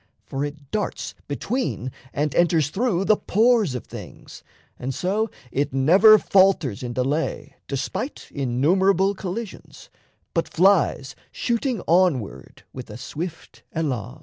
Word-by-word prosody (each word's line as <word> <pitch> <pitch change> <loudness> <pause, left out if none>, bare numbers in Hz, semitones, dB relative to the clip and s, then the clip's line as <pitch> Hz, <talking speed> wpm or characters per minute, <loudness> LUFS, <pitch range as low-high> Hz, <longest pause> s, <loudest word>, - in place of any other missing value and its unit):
For 135 +1 -3
it 145 -1 -7
darts 210 - -3
Between 145 - -2 0.2
and 150 0 -1
enters 165 -4 +2
through 195 -3 0
the 215 - +5
pores 215 - +2
of 125 - -5
things; - - -11 0.4
And 130 +1 -4
so 205 +8 0 0.2
it 140 0 -1
never 185 +11 +7
falters 185 - +3
in 120 -1 -4
delay 135 +6 -2
Despite 140 - -4
innumerable 180 +9 +2
collisions, 195 +2 -7 0.4
but 165 - 0
Flies 175 -7 +2 0.2
shooting 240 -1 -1
onward 165 - 0
with 125 -3 -8
a 105 - -8
swift 160 +6 -7
elan. 130 -4 -3
165 Hz, 120 wpm, -23 LUFS, 135-195 Hz, 0.4 s, never